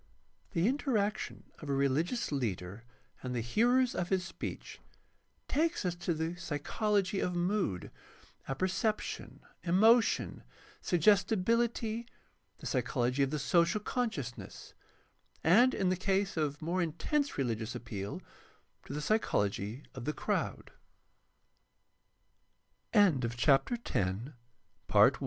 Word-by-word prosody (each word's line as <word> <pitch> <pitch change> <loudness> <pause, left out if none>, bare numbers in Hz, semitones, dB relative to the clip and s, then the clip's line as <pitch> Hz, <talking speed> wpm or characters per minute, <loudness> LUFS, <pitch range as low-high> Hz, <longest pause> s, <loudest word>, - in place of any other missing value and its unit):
The 170 +1 +2
interaction 235 -6 -1 0.2
of 150 - -8
a 140 - +1
religious 145 - 0
leader 105 -6 -3 0.4
and 125 -1 -4
the 120 - 0
hearers 240 - +3
of 180 - -2
his 185 -2 +1
speech - - -7 0.7
takes 325 - 0
us 180 - +1
to 175 -1 -1
the 160 +2 -2
psychology 190 +5 0
of 180 - -1
mood, 175 - -1 0.6
apperception, 190 - -2 0.2
emotion, 220 +7 +3 0.4
suggestibility, 220 +5 +2 0.5
the - - -12
psychology 125 0 0
of 135 - +3
the 150 - -2
social 170 +6 +2
consciousness, 205 - -4 0.7
and, 230 +10 +6
in 190 -2 +1
the 185 - +2
case 195 +1 0
of 150 -2 -1
more 175 +3 0
intense 275 - 0
reHgious 115 -4 -2
appeal, 105 -4 -5 0.6
to - - -6
the 150 - -3
psychology 115 - 0
of 130 -2 -7
t 150 - -1
175 Hz, 100 wpm, -32 LUFS, 140-215 Hz, 0.7 s, and